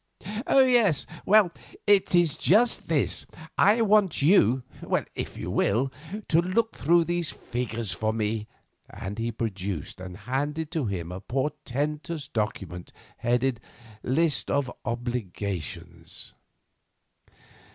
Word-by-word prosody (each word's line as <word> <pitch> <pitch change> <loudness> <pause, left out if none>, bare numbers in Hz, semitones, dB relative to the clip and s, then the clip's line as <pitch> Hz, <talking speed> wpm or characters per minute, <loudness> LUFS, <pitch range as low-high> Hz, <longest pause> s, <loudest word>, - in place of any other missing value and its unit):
"Oh! 270 - +6
yes; 235 - +3 0.2
well, 205 -3 +6 0.3
it 200 -3 +4
is 170 -4 +4
just 225 +6 +3
this. 155 -4 +1 0.3
I 215 +4 +5
want 210 -7 +3
you, 130 - +5 0.5
if - - -5
you - - -4
will, 125 +7 +1 0.4
to 165 +1 +4
look 210 +6 0
through 170 +3 +4
these 175 -1 -1
figures 115 -3 -3
for 110 +1 0
me," 110 -1 -2 0.4
and 100 +3 -6
he 115 +1 -1
produced 100 -7 -4
and 90 -1 -7
handed 145 - -2
to 155 -8 -1
him 90 -4 -3
a 90 - -5
portentous 145 +4 -2
document 95 -7 -3 0.3
headed 120 0 +1 0.4
"List 155 +4 +2
of 140 -3 0
Obligations." 95 - -4
130 Hz, 115 wpm, -27 LUFS, 105-170 Hz, 0.5 s, Oh